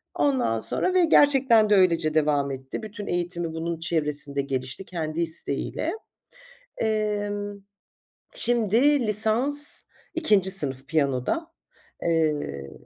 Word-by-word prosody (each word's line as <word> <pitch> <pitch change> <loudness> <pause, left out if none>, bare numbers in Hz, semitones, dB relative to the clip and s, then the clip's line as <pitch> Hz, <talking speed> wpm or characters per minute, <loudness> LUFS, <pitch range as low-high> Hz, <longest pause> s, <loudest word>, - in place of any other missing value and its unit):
Ondan 260 - 0
sonra 365 - -1
ve 370 -1 +3
gerçekten 265 -8 +3
de 210 - +4
öylece 170 -5 +2
devam 145 -2 0
etti. 135 +9 -8
Bütün 210 -1 -9
eğitimi 175 -1 -4
bunun 165 0 -5
çevresinde 150 -4 0
gelişti 135 +6 -5
kendi 165 -2 -5
isteğiyle. 160 0 -2 0.8
Emm, 205 -2 -3 0.7
şimdi 240 +3 +1
lisans 230 +8 +5 0.3
2. 210 - +1
sınıf 135 -8 +2
piyanoda, 150 - -2 0.5
eee 150 - -2
175 Hz, 105 wpm, -24 LUFS, 150-220 Hz, 0.8 s, lisans